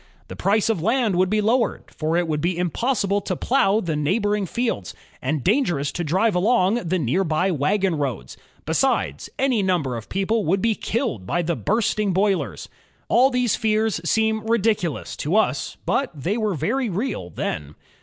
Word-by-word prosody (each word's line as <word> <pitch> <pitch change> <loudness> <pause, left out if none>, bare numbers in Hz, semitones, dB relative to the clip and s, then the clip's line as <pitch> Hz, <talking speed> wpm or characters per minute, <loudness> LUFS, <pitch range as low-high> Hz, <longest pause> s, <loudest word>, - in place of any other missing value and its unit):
The - - -7
price 205 +2 +1
of 225 -7 0
land 225 0 +1
would 185 +1 +2
be 215 +1 +2
lowered, 230 +2 0
for 160 +1 -1
it 175 -1 +1
would 150 -2 -1
be 175 +1 0
impossible 200 - 0
to 185 - -3
plow 215 -1 +2
the 165 -5 -2
neigh 150 +7 +1
boring 205 -2 0
fields, 225 - -2 0.3
and 140 +1 -1
dangerous 175 - +1
to 175 - -3
drive 190 +8 +2
along 205 +3 +2
the 185 +3 +1
near 165 +5 +1
by 180 +3 +1
wagon 185 +5 +1
roads. 135 - -3 0.3
Besides, 70 +2 0
any 260 -5 +2
number 175 -10 0
of 115 -1 -8
people 205 +3 0
would 190 +5 +2
be 225 +2 +2
killed 215 - -3
by 175 - 0
the 170 +1 -1
bursting 210 -1 0
boilers. 185 - 0 0.4
All 255 +3 +5
these 250 -3 +1
fears 220 -2 0
seem 220 +5 +1
ridicu 220 -5 +1
lous - - -7
to 155 +7 -1
us, 220 - +1
but 275 - +1
they 180 +10 -1
were 215 -4 0
very 255 - -1
real 190 - -3
then. 75 -3 -4
195 Hz, 180 wpm, -23 LUFS, 165-220 Hz, 0.4 s, All